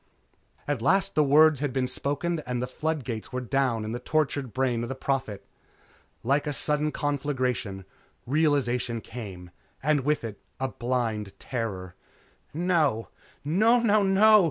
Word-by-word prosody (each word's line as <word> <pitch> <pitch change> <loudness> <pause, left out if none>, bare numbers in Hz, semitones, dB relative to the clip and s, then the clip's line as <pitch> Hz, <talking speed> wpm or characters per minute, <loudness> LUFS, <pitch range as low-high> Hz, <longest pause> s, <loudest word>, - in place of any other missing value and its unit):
At 145 -5 -1
last 190 +9 +2
the 155 - +4
words 150 +1 +5
had 145 -1 -1
been 130 0 0
spoken 145 +6 -1
and 125 -1 -1
the 125 - -1
flood 155 +3 -2
gates 115 -3 -5
were 125 - -2
down 125 -3 0
in 110 - -4
the 120 - -3
tortured 140 -2 -1
brain 130 -2 0
of 120 - -4
the 135 - -3
Prophet. 130 -6 -2 0.8
Like 140 +5 +1
a 150 - -1
sudden 150 +2 +1
conflagration, 130 -10 -2 0.4
realization 125 -5 +1
came 95 -8 -8 0.3
and 150 0 +3
with 150 +1 0
it, 110 -3 -6 0.4
blind 115 -5 -1
terror. 100 -7 -4 0.6
"No! 155 -9 +1 0.4
Nonono! 215 +6 +4
130 Hz, 135 wpm, -27 LUFS, 115-150 Hz, 0.8 s, words